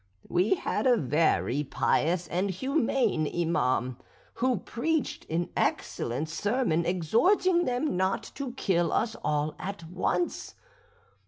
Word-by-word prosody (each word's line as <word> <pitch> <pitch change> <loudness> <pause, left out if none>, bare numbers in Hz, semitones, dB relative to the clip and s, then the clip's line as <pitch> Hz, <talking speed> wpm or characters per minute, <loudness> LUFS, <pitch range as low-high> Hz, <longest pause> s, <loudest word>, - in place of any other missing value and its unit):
"We 185 - +2
had 300 - -1
a 245 -2 +5
very 150 - +1
pious 170 +5 +1
and 185 +3 0
humane 235 - +1
Iman, 130 -7 0 0.4
who 255 -1 +1
preached 300 - -2
an 170 +2 -1
excellent 125 +7 -1
sermon, 170 -2 0
exhorting 345 - +3
them 250 +2 0
not 190 +1 0
to 270 -3 -5
kill 175 -9 +1
us 225 0 0
all 150 0 0
at 190 -3 -6
once. 180 0 -2
180 Hz, 115 wpm, -28 LUFS, 160-245 Hz, 0.4 s, a